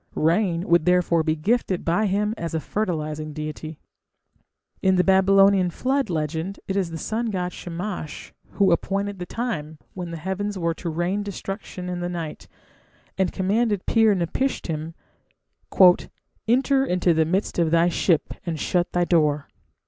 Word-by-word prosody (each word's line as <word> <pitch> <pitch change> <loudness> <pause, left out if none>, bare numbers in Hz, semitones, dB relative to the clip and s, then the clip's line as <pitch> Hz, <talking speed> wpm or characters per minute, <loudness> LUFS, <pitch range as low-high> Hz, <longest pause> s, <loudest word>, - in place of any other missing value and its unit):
Rain 170 +2 +1
would 170 -2 +4
therefore 180 -2 +3
be 155 0 0
gifted 190 +2 0
by 190 +6 +2
him 210 +2 0
as 165 -5 -4
a - - +1
fertilizing 155 -6 -3
deity. 155 +1 -6 1.0
In 190 0 +3
the 180 - +4
Babylonian 195 0 +5
Flood 265 +5 -1
legend 160 +3 -3
it 195 - -2
is 190 -4 0
the 165 - -6
sun 225 +8 -2
god 180 -4 -2
Shamash 175 -2 -6 0.2
who 195 -3 +3
"appointed 200 +3 -1
the 180 - -5
time" 160 -11 -4 0.2
when 180 -2 -6
the 170 - -5
heavens 190 +4 -3
were 170 -2 0
to 170 +1 -5
"rain 175 +5 -1
destruction" 195 -2 -6
in 180 -1 -3
the 175 0 -3
night, 170 -3 -6 0.7
and 190 -2 +1
commanded 205 +1 0
Pir 225 -3 +4
napishtim, 165 - -2 1.5
"Enter 265 +3 +3
into 180 -7 +2
the 160 0 +2
midst 185 +3 -1
of 165 -2 +3
thy 165 +1 +4
ship 170 -2 +1
and 165 -3 -3
shut 175 +3 0
thy 175 0 +2
door". 150 -4 +2
180 Hz, 155 wpm, -24 LUFS, 165-200 Hz, 1.5 s, Babylonian